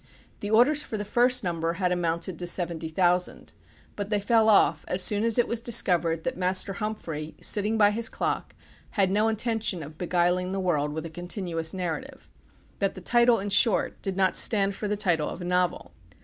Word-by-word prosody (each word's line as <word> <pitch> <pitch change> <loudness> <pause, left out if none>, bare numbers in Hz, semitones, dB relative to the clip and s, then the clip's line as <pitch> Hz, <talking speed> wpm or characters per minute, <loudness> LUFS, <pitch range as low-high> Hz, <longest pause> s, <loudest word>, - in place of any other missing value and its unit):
The 205 - -5
orders 250 +7 +4
for 220 - -5
the 205 - -4
first 245 +4 +2
number 165 -2 -2
had 180 0 -1
amounted 170 0 -2
to 175 - -3
seventy 170 -2 -1
thousand; 180 +2 0 0.4
but 205 -1 -5
they 210 -1 +1
fell 220 +1 +3
off 165 -7 +3
as 180 0 0
soon 210 0 +1
as 230 0 +1
it 240 - +2
was 235 -1 -2
discovered 170 -8 +2
that - - -3
Master 185 +2 0
Humphrey, 170 -8 -5
sitting 210 +1 +1
by 205 -1 +5
his 225 +2 -1
clock, - - -3 0.4
had 190 -2 +2
no 210 +3 +2
intention 220 -5 -1
of 155 +2 -12
beguiling 180 +1 0
the 195 - -2
world 150 -6 0
with 160 +2 -5
a 165 - -7
continuous 175 -1 -3
narrative, 190 - -6 0.5
that 195 -1 -1
the - - -8
title, 240 +4 +4
in 200 +1 -4
short, 210 +2 +2
did 195 -1 -4
not 190 -1 +2
stand 200 -2 +3
for 210 - -5
the 210 0 -2
title 175 -7 0
of - - -8
a 175 - -6
novel. 180 0 -1
190 Hz, 195 wpm, -26 LUFS, 175-215 Hz, 0.5 s, by